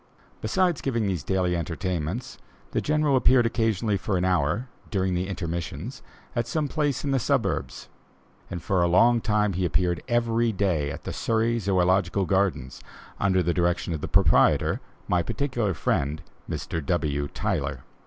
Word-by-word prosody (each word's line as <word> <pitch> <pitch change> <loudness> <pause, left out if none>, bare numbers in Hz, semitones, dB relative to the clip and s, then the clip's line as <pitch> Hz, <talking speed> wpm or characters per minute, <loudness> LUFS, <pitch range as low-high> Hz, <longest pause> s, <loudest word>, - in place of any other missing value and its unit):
Besides 180 -7 +1
giving 115 -5 0
these 95 -5 -1
daily 90 0 0
entertainments, 85 - -3 0.3
the - - 0
General 150 -2 +2
appeared 125 -1 +5
occasionally 110 -2 +1
for 95 0 -1
an 90 - 0
hour, 90 - +1 0.2
during 95 -3 0
the 90 +1 -1
intermissions, 85 - -5 0.3
at 120 -1 0
some 150 +3 -1
place 145 -3 -1
in 140 - -1
the 135 - +2
suburbs; - - -1 0.6
and 90 -2 -6
for 95 -2 +1
a 85 - +3
long 115 +7 +4
time 105 -2 +1
he 90 +2 -1
appeared 85 +1 +1
every 115 -1 +1
day 90 -8 0
at 70 - -7
the - - -5
Surrey 115 +1 +1
Zoölogical 95 -1 +2
Gardens, 90 -10 0 0.4
under 95 -2 +2
the 85 +1 +1
direction 85 0 0
of 80 - -4
the - - -3
proprietor, - - +3 0.3
my 90 - +2
particular 120 - -1
friend 75 +3 -1 0.3
Mr. 80 -2 -3
W. 75 -2 0
Tyler. - - -2
95 Hz, 155 wpm, -26 LUFS, 85-115 Hz, 0.6 s, appeared